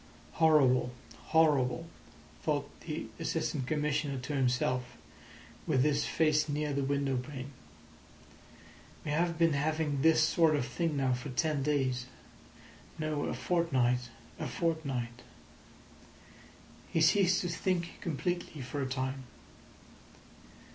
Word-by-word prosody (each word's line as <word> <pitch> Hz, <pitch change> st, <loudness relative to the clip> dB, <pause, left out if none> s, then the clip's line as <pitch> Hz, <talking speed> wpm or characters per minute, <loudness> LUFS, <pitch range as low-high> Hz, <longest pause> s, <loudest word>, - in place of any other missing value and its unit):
"Horrible, 135 Hz, -6 st, +4 dB, 0.3 s
horrible!" 150 Hz, -3 st, +3 dB, 0.6 s
thought -, -, 0 dB
the -, -, -5 dB
Assistant 130 Hz, -3 st, -2 dB
Commissioner 150 Hz, -2 st, 0 dB
to 130 Hz, +3 st, -5 dB
himself, 125 Hz, -2 st, 0 dB, 0.7 s
with 130 Hz, -, +3 dB
his 150 Hz, -1 st, +2 dB
face 155 Hz, -1 st, +2 dB
near 150 Hz, 0 st, -1 dB
the 140 Hz, 0 st, 0 dB
window 140 Hz, -1 st, 0 dB
pane. 135 Hz, +1 st, -6 dB, 1.5 s
"We 150 Hz, -, -2 dB
have 165 Hz, +2 st, +1 dB
been 165 Hz, -2 st, +4 dB
having 150 Hz, -1 st, 0 dB
this 160 Hz, +1 st, +5 dB
sort 160 Hz, 0 st, +4 dB
of 140 Hz, -, 0 dB
thing 155 Hz, +4 st, -1 dB
now 135 Hz, -2 st, +2 dB
for 125 Hz, 0 st, -4 dB
ten 140 Hz, +4 st, 0 dB
days; 130 Hz, -3 st, 0 dB, 0.9 s
no, 155 Hz, -2 st, -1 dB
a -, -, -2 dB
fortnight—a 125 Hz, -8 st, -1 dB
fortnight." 135 Hz, -8 st, -2 dB, 1.7 s
He -, -, +1 dB
ceased 185 Hz, +4 st, +4 dB
to 180 Hz, -, -2 dB
think 175 Hz, 0 st, -2 dB
completely 170 Hz, -2 st, -3 dB
for 135 Hz, +3 st, -4 dB
a 135 Hz, -, -1 dB
time. 130 Hz, 0 st, -3 dB
145 Hz, 115 wpm, -31 LUFS, 130-160 Hz, 1.7 s, this